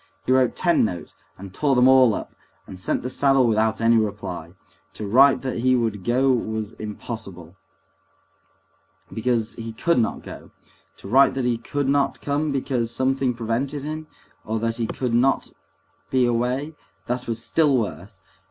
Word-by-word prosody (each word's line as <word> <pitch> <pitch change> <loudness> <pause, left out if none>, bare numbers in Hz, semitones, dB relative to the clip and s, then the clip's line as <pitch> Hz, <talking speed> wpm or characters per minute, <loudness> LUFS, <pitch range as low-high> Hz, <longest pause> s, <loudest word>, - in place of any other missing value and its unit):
He - - 0
wrote 130 -2 +3
ten 170 -2 +2
notes, 90 -6 -4 0.2
and 95 0 -10
tore 140 +4 +1
them 125 +1 +5
all 130 -4 +6
up, - - -7 0.3
and 95 - -10
sent 95 - -2
the - - -2
saddle 135 -2 +3
without 110 -1 +1
any 115 0 +4
reply. 100 -6 -3 0.4
To 105 - -5
write 130 +5 +5
that 130 -3 -3
he 130 +2 +3
would 110 -5 -1
go 130 +4 +2
was 110 -2 -3
impossible, 100 -5 -7 1.6
because 115 -1 -1
he 115 -1 -7
could 170 +5 +1
not 115 - -1
go; - - -10 0.5
to - - -11
write 135 +7 +4
that 130 -2 -1
he 120 -2 0
could 140 +4 -3
not 140 0 +1
come 145 +1 -1
because 130 -4 -1
something 130 +1 0
prevented 125 +5 -2
him, 155 +1 -5 0.4
or 110 +1 -2
that 115 +1 -2
he 115 -2 -1
would 125 +1 +1 0.6
be 130 -1 +2
away, 125 +6 -1 0.3
that 125 +1 -3
was 115 0 -3
still 150 -5 +3
worse. 100 -3 -5
120 Hz, 160 wpm, -23 LUFS, 110-135 Hz, 1.6 s, all